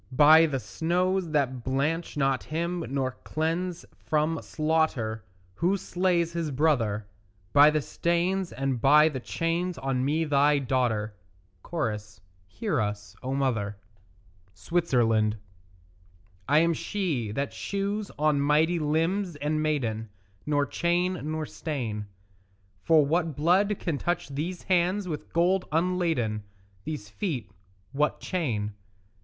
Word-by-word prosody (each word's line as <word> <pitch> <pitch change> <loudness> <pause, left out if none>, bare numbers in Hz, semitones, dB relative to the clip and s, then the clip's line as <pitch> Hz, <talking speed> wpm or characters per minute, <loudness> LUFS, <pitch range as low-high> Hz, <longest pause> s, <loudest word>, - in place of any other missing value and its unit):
By 160 +2 +8
the 135 -3 -2
snows 180 +5 0
that 130 -5 0
blanch 145 +6 -1
not 135 -2 +1
him 170 +2 -2
nor 135 -1 -1
cleanse 170 +3 -2 0.2
from 155 +1 0
slaughter 155 -9 0 0.3
Who 180 - +1
slays 175 -3 0
his 165 -2 -2
brother; 125 -8 +1 0.5
By 145 +1 +8
the 155 -1 0
stains 175 +4 0
and 130 -1 -2
by 150 +4 +6
the 135 -4 -4
chains 170 +6 -2
on 130 -1 -1
me 155 +4 +1
thy 145 0 +4
daughter; 120 -5 0 0.6
(Cho.) 150 -11 0 0.5
Hear 200 - -2
us, 105 0 -4
O 130 +1 -2
mother. 110 -7 -1 0.8
SWITZERLAND 115 - +1 1.1
I 145 - +5
am 170 +1 +4
she 155 - -2
that 140 +5 -2
shews 200 +1 -3
on 150 -1 +2
mighty 155 +4 +3
limbs 165 +4 0
and 150 +1 -1
maiden 115 -8 -1 0.4
Nor 145 -1 +2
chain 175 +3 0
nor 155 0 -2
stain; 115 -11 -4 0.7
For 160 -3 +4
what 160 0 0
blood 185 +7 +3
can 155 -5 -2
touch 175 -4 -2
these 165 +6 -4
hands 185 +2 +1
with 155 -4 -5
gold 180 +3 +2
unladen, 165 -10 0 0.4
These 150 -10 -5
feet 125 - -4 0.4
what 150 +2 0
chain? 115 - -2
155 Hz, 125 wpm, -27 LUFS, 130-170 Hz, 1.1 s, By